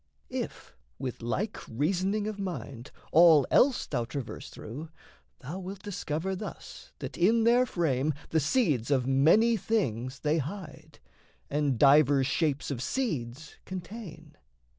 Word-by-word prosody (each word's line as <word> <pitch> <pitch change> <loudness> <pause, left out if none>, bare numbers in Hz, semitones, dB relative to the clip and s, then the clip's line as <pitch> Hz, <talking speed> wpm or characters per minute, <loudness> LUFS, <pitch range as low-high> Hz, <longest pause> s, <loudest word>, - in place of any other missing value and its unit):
If, - - -5 0.2
with 130 -2 -5
like 195 - -2
reasoning 185 - 0
of 215 -1 -4
mind, 140 - -5 0.2
all 160 -4 +7
else 260 -1 +4
Thou 120 - -2
traverse 130 0 -6
through, 145 +9 -8 0.5
thou 155 +9 -6
wilt 190 +1 -8
discover 190 -1 -3
thus 205 +3 -9
That - - -7
in 225 +6 +4
their 245 +2 +4
frame 150 - 0
the 160 - +2
seeds 150 - +1
of 130 -3 +2
many 165 - +4
things 130 - -2
They 155 +2 +1
hide, 160 +2 -7 0.5
and 145 -3 +1
divers 140 0 +5
shapes 145 0 0
of 125 -4 -3
seeds 150 - -3
contain. 175 -4 -8
155 Hz, 130 wpm, -29 LUFS, 135-195 Hz, 0.5 s, all